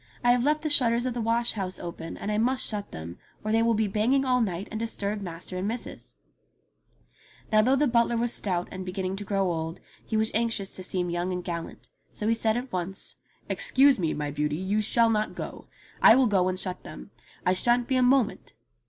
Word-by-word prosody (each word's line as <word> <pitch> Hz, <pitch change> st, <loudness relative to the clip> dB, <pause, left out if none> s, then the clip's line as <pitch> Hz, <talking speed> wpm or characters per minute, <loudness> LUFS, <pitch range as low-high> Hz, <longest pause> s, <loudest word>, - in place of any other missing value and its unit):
I 245 Hz, -, +5 dB
have 245 Hz, 0 st, +3 dB
left 300 Hz, +2 st, +1 dB
the -, -, 0 dB
shutters 240 Hz, -4 st, +3 dB
of 255 Hz, -, -1 dB
the 240 Hz, -, -3 dB
wash 230 Hz, +1 st, +1 dB
house 190 Hz, -3 st, -3 dB
open, 170 Hz, -1 st, -7 dB
and 210 Hz, -, -3 dB
I 210 Hz, -, +1 dB
must 255 Hz, +3 st, +1 dB
shut 205 Hz, -2 st, -3 dB
them, 80 Hz, +2 st, -8 dB, 0.2 s
or 215 Hz, -, -1 dB
they 225 Hz, +1 st, +3 dB
will 230 Hz, 0 st, +3 dB
be 215 Hz, 0 st, +1 dB
banging 235 Hz, +7 st, +2 dB
all 250 Hz, -1 st, +2 dB
night 190 Hz, -2 st, -2 dB
and 220 Hz, -, -4 dB
disturb 210 Hz, -2 st, -3 dB
master 180 Hz, 0 st, -6 dB
and 190 Hz, -, -2 dB
missus 230 Hz, +2 st, -6 dB, 0.6 s
!'* -, -, -27 dB
Now 215 Hz, 0 st, +6 dB
though 255 Hz, +5 st, +3 dB
the 290 Hz, +2 st, +3 dB
butler 235 Hz, -2 st, +2 dB
was 240 Hz, +1 st, +1 dB
stout 180 Hz, -3 st, -1 dB
and 185 Hz, 0 st, -6 dB
beginning 185 Hz, 0 st, -3 dB
to 205 Hz, -, -5 dB
grow 195 Hz, -2 st, 0 dB
old, 160 Hz, 0 st, -4 dB, 0.2 s
he 220 Hz, -, -2 dB
was 220 Hz, 0 st, +1 dB
anxious 225 Hz, -3 st, -1 dB
to -, -, -6 dB
seem 180 Hz, -1 st, -2 dB
young 175 Hz, +2 st, -1 dB
and 180 Hz, -1 st, -3 dB
gallant; 170 Hz, -1 st, -6 dB, 0.3 s
so 210 Hz, -, -3 dB
he 225 Hz, -, +4 dB
said 225 Hz, 0 st, +1 dB
at 250 Hz, +1 st, -5 dB
once: 185 Hz, +2 st, -3 dB, 0.3 s
"Excuse 270 Hz, -2 st, +4 dB
me, 165 Hz, -3 st, 0 dB
my 150 Hz, -1 st, -3 dB
beauty, 150 Hz, +1 st, -1 dB
you 190 Hz, +5 st, 0 dB
shall 230 Hz, +2 st, +4 dB
not 215 Hz, -1 st, -1 dB
go. -, -, -7 dB, 0.3 s
I -, -, +9 dB
will 260 Hz, 0 st, +4 dB
go 195 Hz, -5 st, +2 dB
and 185 Hz, 0 st, -2 dB
shut 185 Hz, -1 st, -3 dB
them. -, -, -10 dB, 0.3 s
I 180 Hz, -, +4 dB
shan't 240 Hz, +5 st, +2 dB
be 260 Hz, -, +1 dB
a 255 Hz, -, +3 dB
moment 250 Hz, -2 st, +2 dB
215 Hz, 225 wpm, -27 LUFS, 185-235 Hz, 0.6 s, I